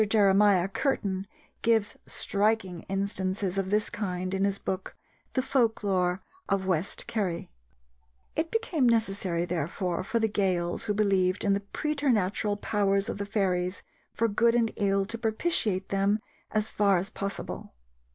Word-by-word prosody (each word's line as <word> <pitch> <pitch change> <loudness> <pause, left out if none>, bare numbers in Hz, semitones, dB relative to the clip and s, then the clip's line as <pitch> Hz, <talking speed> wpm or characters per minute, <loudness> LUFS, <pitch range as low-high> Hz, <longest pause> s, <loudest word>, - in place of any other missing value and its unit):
Jeremiah 200 -3 +5
Curtin 195 -4 -1 0.3
gives 225 -3 +2
striking 200 -4 0
instances 195 -1 -1
of 190 -1 -2
this 210 +1 +1
kind 185 -3 -3
in 195 0 +2
his 200 0 0
book, 190 -1 -4 0.4
the 260 - +1
Folk 235 -6 +1
Lore 185 -2 +1 0.3
of 195 -1 +1
West 185 -1 -1
Kerry. 190 - -2 0.8
It 320 +1 0
became 335 - +1
necessary, 195 -6 +1
therefore, 175 +1 -2
for 230 - -1
the 220 -1 +2
Gaels 185 -3 0
who 210 -2 0
believed 195 -2 +2
in 200 - +3
the 200 - +1
preternatural 210 -4 0
powers 200 0 +1
of 205 - -4
the 200 - -3
fairies 185 -3 0 0.3
for 230 - +1
good 230 +2 +3
and 230 -2 +2
ill 195 -1 +2
to 230 +3 -5
propitiate 220 - 0
them 195 +1 +2 0.3
as 215 0 0
far 200 -3 +3
as 185 +3 -2
possible. 200 0 -5
200 Hz, 145 wpm, -28 LUFS, 190-220 Hz, 0.8 s, Jeremiah